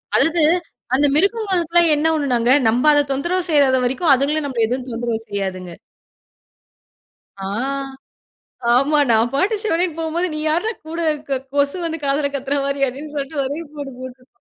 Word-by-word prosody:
அதாவது 330 Hz, +1 st, +2 dB, 0.5 s
அந்த 285 Hz, +2 st, +3 dB
மிருகங்களுக்குலா 365 Hz, -2 st, +2 dB
என்ன 300 Hz, +2 st, +1 dB
ஒன்னுனாங்க, 250 Hz, -6 st, +1 dB, 0.2 s
நம்ம 240 Hz, +5 st, +2 dB
அதத் 290 Hz, -1 st, +2 dB
தொந்தரவு 345 Hz, +7 st, -1 dB
செய்யாத 285 Hz, -4 st, +4 dB
வரைக்கோ 260 Hz, +7 st, -1 dB
அதுங்கலோ 285 Hz, +4 st, 0 dB
நம்மள 245 Hz, -5 st, 0 dB
எதுவும் 250 Hz, +2 st, -3 dB
தொந்தரவு 235 Hz, -1 st, -2 dB
செய்யாதுங்க. 190 Hz, -3 st, -4 dB, 1.7 s
ஆ, -, -, -6 dB, 1.3 s
ஆமா 290 Hz, +4 st, +3 dB
நான் 225 Hz, +1 st, +3 dB
பாட்டுச் 400 Hz, +9 st, +1 dB
சிவனேனு 345 Hz, -4 st, 0 dB
போம்போது 330 Hz, +2 st, -1 dB
நீ 305 Hz, -, -3 dB
யார்ரா 345 Hz, +9 st, +1 dB, 0.2 s
கூட 330 Hz, +1 st, -5 dB, 0.3 s
க 270 Hz, -2 st, -1 dB
கொசு 285 Hz, +3 st, +1 dB
வந்து 325 Hz, 0 st, -3 dB
காதுல 280 Hz, +1 st, 0 dB
கத்துற 275 Hz, +1 st, -2 dB
மாரி 280 Hz, 0 st, -2 dB
அப்படின்னு 290 Hz, +4 st, -7 dB
சொல்டு 280 Hz, +1 st, -3 dB
ஒரெ 285 Hz, +5 st, -4 dB
போடு 285 Hz, -2 st, -6 dB
போட்ரும். 255 Hz, 0 st, -11 dB
285 Hz, 145 wpm, -20 LUFS, 255-325 Hz, 1.7 s, செய்யாத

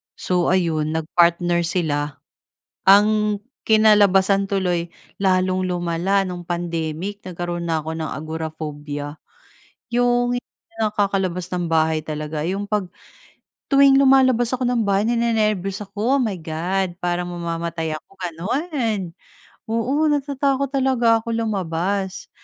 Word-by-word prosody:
So 180 Hz, -1 st, 0 dB
ayun 160 Hz, -4 st, 0 dB
nag-partner 170 Hz, +1 st, +2 dB
sila. 150 Hz, -4 st, -1 dB, 0.8 s
Ang 210 Hz, +1 st, +5 dB, 0.3 s
kinalabasan 200 Hz, -3 st, +5 dB
tuloy, 180 Hz, -3 st, 0 dB, 0.3 s
lalong 185 Hz, -1 st, +2 dB
lumala 175 Hz, +2 st, 0 dB
no'ng 180 Hz, -1 st, -5 dB
pandemic 170 Hz, +2 st, -3 dB
nagkaroon 175 Hz, -1 st, -4 dB
na 160 Hz, -1 st, 0 dB
ako 160 Hz, +1 st, -5 dB
ng 160 Hz, -1 st, -3 dB
agoraphobia 150 Hz, -2 st, -6 dB, 0.8 s
Yong 245 Hz, 0 st, +2 dB
hindi 245 Hz, -, -7 dB, 0.3 s
nakakalabas 195 Hz, -4 st, 0 dB
ng 180 Hz, -1 st, -2 dB
bahay 160 Hz, -1 st, +2 dB
talaga 155 Hz, 0 st, -4 dB
'yong 195 Hz, +4 st, -2 dB
'pag, 210 Hz, -2 st, 0 dB, 0.9 s
tuwing 275 Hz, 0 st, +6 dB
lumalabas 260 Hz, -3 st, +4 dB
ako 255 Hz, 0 st, -1 dB
ng 245 Hz, -1 st, +1 dB
bahay 200 Hz, 0 st, +1 dB
ninenerbiyos 215 Hz, -5 st, 0 dB
ako, 220 Hz, +7 st, 0 dB
oh -, -, 0 dB
my 220 Hz, -6 st, 0 dB
God! 175 Hz, +3 st, -2 dB
Parang 175 Hz, 0 st, -2 dB
mamamatay 170 Hz, -2 st, -3 dB
ako, 155 Hz, -, -11 dB
gano'n. 210 Hz, -, -2 dB, 0.6 s
Oo 255 Hz, +7 st, +1 dB
natatakot 280 Hz, -2 st, 0 dB
talaga 255 Hz, -4 st, +3 dB
ako 230 Hz, +1 st, -4 dB
lumabas. 190 Hz, -1 st, -2 dB
185 Hz, 115 wpm, -21 LUFS, 170-220 Hz, 0.9 s, tuwing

